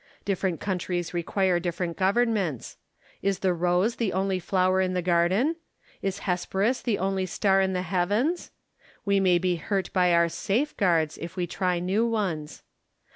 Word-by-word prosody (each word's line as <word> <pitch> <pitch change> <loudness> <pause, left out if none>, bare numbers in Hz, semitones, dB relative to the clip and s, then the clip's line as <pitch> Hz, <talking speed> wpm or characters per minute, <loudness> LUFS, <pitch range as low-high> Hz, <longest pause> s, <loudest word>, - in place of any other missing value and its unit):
Different 190 -4 -1
countries 180 -3 -2
require 180 +1 +1
different 175 -1 -3
governments. 195 - 0 0.5
Is 195 -1 0
the 185 - +3
rose 180 +6 +1
the 220 -6 -1
only 190 0 0
flower 185 +1 +2
in 185 -1 0
the 180 - +1
garden? 185 - +2 0.4
Is 195 0 -3
Hesperus 195 +6 0
the 225 -5 0
only 190 0 -1
star 195 +1 +2
in 190 0 +1
the 180 0 -1
heavens? 205 - 0 0.6
We 200 -1 +3
may 185 -2 +4
be 175 -1 0
£urt 195 +3 -2
by 180 -2 +3
our 170 0 +4
safeguards, 185 - 0
if 170 +2 -7
we 180 -2 -1
try 180 0 -1
new 185 +6 0
ones. 185 -10 -3
185 Hz, 155 wpm, -26 LUFS, 175-200 Hz, 0.6 s, may